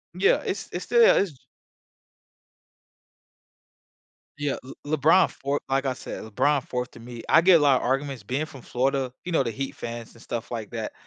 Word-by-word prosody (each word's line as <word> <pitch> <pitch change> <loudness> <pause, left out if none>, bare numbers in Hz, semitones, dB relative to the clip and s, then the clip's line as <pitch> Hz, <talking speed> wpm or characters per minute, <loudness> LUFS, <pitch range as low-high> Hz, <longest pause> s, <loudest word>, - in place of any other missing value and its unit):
Yeah, 190 +2 +3
it's 195 - -3
it's 175 - -4
still 235 -1 +6
it's 165 -10 -1 3.0
Yeah, 145 -1 -1 0.3
Le 155 +2 0
LeBron 160 +6 +5
4th, 140 +1 -3
like 135 +1 +1
I 130 - +1
said, - - -7
LeBron 130 +6 +1
4th 125 0 -3
to - - -14
me. 120 0 -9
I 165 - +6
get 175 -1 +7
a - - +2
lotta 140 -3 +4
arguments 135 -2 -1
being 130 +8 -2
from 140 -4 -12
Florida, 130 +1 -1
you 180 - -4
know, 160 - +3
the 115 - -2
Heat 135 +4 -5
fans 115 -1 -7
and 115 - -17
stuff 120 -1 -5
like 115 -3 -5
that. 115 -2 -4
135 Hz, 180 wpm, -25 LUFS, 120-150 Hz, 3.0 s, get